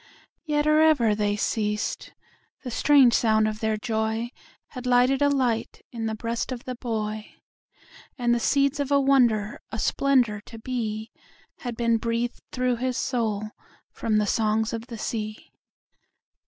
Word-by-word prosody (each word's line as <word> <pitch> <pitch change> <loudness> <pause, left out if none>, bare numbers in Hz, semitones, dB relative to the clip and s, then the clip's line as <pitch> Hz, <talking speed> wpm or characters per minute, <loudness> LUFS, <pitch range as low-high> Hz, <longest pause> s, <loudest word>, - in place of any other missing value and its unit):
Yet 295 -1 +1
or 305 0 +4
ever 280 -9 +4
they 205 -1 0
ceas'd, 210 0 -2 0.5
the 250 - -5
strange 270 -1 +5
sound 220 -1 +3
of 215 0 -3
their 220 -1 0
joyHad 220 +1 -2 0.6
lighted 250 +2 +3
a 285 - +4
light 250 -5 -1
in 230 -2 -3
the 220 - -2
breast 230 +3 -3
of 245 -2 -5
the 255 - -4
boy:And 225 +1 -5
the 240 - +1
seeds 280 +4 +2
of 285 -1 -1
a 280 - +5
wonder, 240 -7 +2
a 220 - -4
splendor 245 -4 +2
to 230 - -10
beHad 225 0 -6
been 230 -1 +2
breath'd 230 +1 -2
through 250 -1 0
his 255 +1 -2
soul 215 -5 -1 0.4
from 215 -2 0
the 210 - +2
songs 220 +2 +1
of 230 +1 -5
the 235 -3 -7
sea. 215 -1 -5
230 Hz, 145 wpm, -25 LUFS, 220-255 Hz, 0.6 s, strange